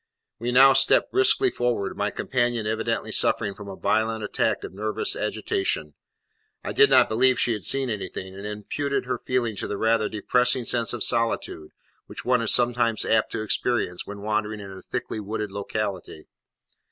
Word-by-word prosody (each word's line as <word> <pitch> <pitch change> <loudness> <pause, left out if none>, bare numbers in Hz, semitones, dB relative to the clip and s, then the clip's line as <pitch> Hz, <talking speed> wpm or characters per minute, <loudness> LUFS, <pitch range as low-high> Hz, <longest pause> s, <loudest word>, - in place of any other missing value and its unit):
We 120 +2 -2
now 135 +2 +7
stepped 135 +1 +3
briskly 390 0 +3
forward, 120 - -1
my 105 +1 -1
companion 120 -1 -1
evidently 115 +1 -2
suffering 100 - +2
from 105 0 -11
a 95 - -7
violent 110 +1 0
attack 105 - -1
of - - -7
nervous 105 +2 -2
agitation. 95 -7 -2 0.7
I - - -4
did - - +6
not - - +6
believe 125 +3 +2
she 120 - +2
had 105 -6 -5
seen 135 -1 0
anything, 100 -4 -5
and 100 +1 -9
imputed 125 +7 -3
her 130 - -2
feeling 120 -4 -1
to - - -3
the 100 - -4
rather 110 -1 +1
depressing 125 +4 +1
sense 115 -2 +1
of 120 - -2
solitude 115 -9 -1 0.4
which - - -8
one 125 -1 +2
is 115 - +2
sometimes 120 -2 +2
apt 110 -1 +2
to 110 - -2
experience 110 -4 -1
when 100 0 -8
wandering 105 0 -2
in 100 -1 -9
a 95 - -10
thickly - - -5
wooded 105 0 -4
locality. 100 -5 -4
110 Hz, 175 wpm, -24 LUFS, 105-120 Hz, 0.7 s, now